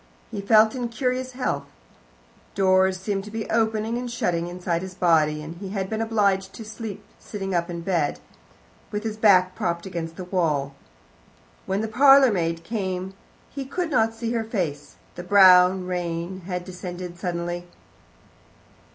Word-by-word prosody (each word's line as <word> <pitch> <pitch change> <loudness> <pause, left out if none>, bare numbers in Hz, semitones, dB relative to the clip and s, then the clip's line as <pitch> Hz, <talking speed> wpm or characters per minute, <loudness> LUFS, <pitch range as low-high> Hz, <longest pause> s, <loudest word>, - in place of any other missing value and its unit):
He 200 - -4
felt 215 +2 +5
in 245 -2 -3
curious 255 +2 -2
health: 255 0 -2 0.9
doors 190 -1 +3
seemed 195 0 -2
to - - -8
be 220 0 -5
opening 220 +1 0
and 245 0 -5
shutting 175 -7 -1
inside 175 -1 -2
his 190 -1 -7
body, 155 -4 +2
and 165 +2 -8
he 195 +1 -7
had 190 0 -3
been 220 0 -1
obliged 200 -4 +1
to 225 - -9
steep 220 -2 -7 0.2
sitting 195 -2 -5
up 170 0 0
in 170 -1 -5
bed, 170 -4 0 0.7
with 210 +1 -4
his 220 -1 -3
back 185 -4 +4
propped 170 0 -2
against 165 -3 -5
the 185 - -6
wall. 155 -7 0 0.9
When 195 +2 0
the 220 - -2
parlourmaid 220 -10 +4
came 190 -3 -3 0.4
he 275 - -5
could 325 +5 -3
not 225 -3 +2
see 230 0 -3
her 230 -1 0
face; 175 -10 -4 0.2
the 175 - -8
brown 185 -1 +6
rain 175 0 -3
had 180 -2 -3
descended 180 -1 -7
suddenly. 175 0 -3
190 Hz, 155 wpm, -24 LUFS, 175-220 Hz, 0.9 s, brown